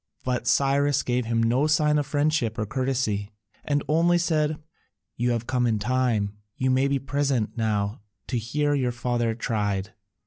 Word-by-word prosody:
But 125 -1 -2
Cyrus 140 +1 +2
gave 125 -1 0
him 115 0 +1
no 125 +6 +2
sign 150 -1 +3
of 145 - -2
friendship 145 -5 0
or 105 - -1
courtesy, 120 -4 -1 0.3
and 145 -1 0
only 170 +3 +3
said, 155 -3 +1 0.6
"You 120 +1 0
have 120 -1 -1
come 125 -1 +1
in 110 -2 +1
time, 110 -3 0 0.2
you 130 0 +1
may 130 +2 +3
be 140 0 +1
present 135 -4 -1
now 105 -2 -1 0.2
to 125 - -2
hear 145 +6 0
your 130 -4 +1
father 120 -1 -1
tried." 105 -4 -2
125 Hz, 165 wpm, -25 LUFS, 115-145 Hz, 0.6 s, sign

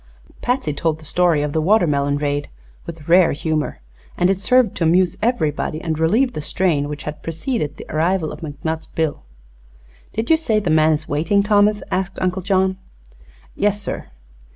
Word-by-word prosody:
Patsy 245 - 0
told 155 +1 -1
the 155 - -14
story 170 -2 +2
of 150 -1 -3
the 160 - +1
watermelon 150 -7 +2
raid 145 0 -2 0.4
with 160 -3 -9
rare 175 0 +5
humor, 155 - -2 0.4
and 180 +2 +3
it 195 - -1
served 250 0 +3
to - - 0
amuse 175 +2 +3
everybody 155 - 0
and 160 -2 -3
relieve 230 +11 +2
the 155 - -4
strain 150 -3 0
that 145 0 -6
had 150 0 -6
preceded 165 - -3
the - - -9
arrival 165 +1 0
of - - -8
McNutt's 160 +1 -4
bill. 160 -3 -2 0.9
"Did 225 +7 -2
you 320 - +6
say 225 -9 +1
the 180 -6 -1
man 155 0 +4
is 155 +1 -3
waiting, 165 +8 +1
Thomas?" 210 0 +3
asked 190 0 -2
Uncle 185 +1 -1
John. 190 0 +1 0.7
"Yes, 205 0 0
sir." 200 - -5
165 Hz, 175 wpm, -20 LUFS, 155-200 Hz, 0.9 s, you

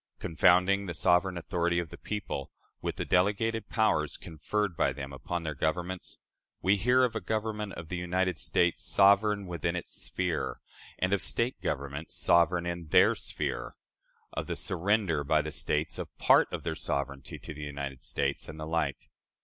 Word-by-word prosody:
Confounding 90 +4 +3
the 85 - -4
sovereign 90 +3 +3
authority 85 0 0
of 85 -3 -2
the - - -9
people 95 -9 -4 0.3
with - - -2
the - - -3
delegated 105 +5 +1
powers 75 - +1
conferred 90 +4 -2
by - - +2
them 70 +1 -7
upon 85 +6 -4
their 75 -2 -2
governments, 85 +5 -2 0.4
we 95 +2 +3
hear 125 +6 +4
of 125 - +1
a - - -1
Government 105 -2 -2
of 80 -1 -8
the 90 - -3
United 90 0 0
States 90 -1 +1
"sovereign 100 +1 +4
within 85 -1 -2
its 90 - -5
sphere," 90 -4 -2 0.4
and 95 +1 +1
of 100 - +2
State 120 +2 -1
governments 70 +2 -3
"sovereign 85 0 +3
in 85 -2 -4
their - - +6
sphere"; 60 +1 -4 0.6
of - - -3
the - - -2
surrender 95 -4 +1
by 75 +2 +3
the 75 +1 -3
States 65 -3 -1
of - - -4
part - - +5
of - - -4
their - - -1
sovereignty 70 -1 -3
to - - -8
the 75 - -9
United 70 -2 -5
States, - - -1
and 80 0 -8
the 75 - -4
like. 80 -3 -2
85 Hz, 175 wpm, -30 LUFS, 75-100 Hz, 0.6 s, their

